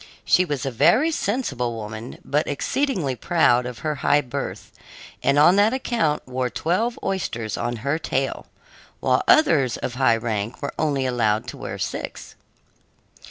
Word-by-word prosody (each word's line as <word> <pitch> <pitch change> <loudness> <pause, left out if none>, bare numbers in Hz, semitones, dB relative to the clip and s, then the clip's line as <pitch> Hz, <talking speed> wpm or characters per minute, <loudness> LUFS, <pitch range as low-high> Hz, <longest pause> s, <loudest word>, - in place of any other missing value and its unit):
She 185 - +4
was 145 -6 -3
a 135 - -1
very 255 - +4
sensible 140 - -2
woman, 110 +1 -7
but 150 +2 0
exceedingly 175 - -1
proud 125 -5 +2
of 125 -2 -7
her 155 - +1
high 145 0 +4
birth, 125 -4 -6 0.5
and 140 +1 +2
on 175 +6 +6
that 210 +3 +4
account 225 - -1
wore 130 0 -2
twelve 215 - -1
oysters 115 - -2
on 120 - -2
her 150 +3 +1
tail, 135 -4 -2 0.5
while - - +2
others 140 - +4
of 120 - -4
high 125 -3 +3
rank 110 -1 -3
were 140 - -4
only 145 -4 +1
allowed 110 -4 +1
to - - -8
wear - - -6
six. - - -5
140 Hz, 155 wpm, -23 LUFS, 120-175 Hz, 0.5 s, on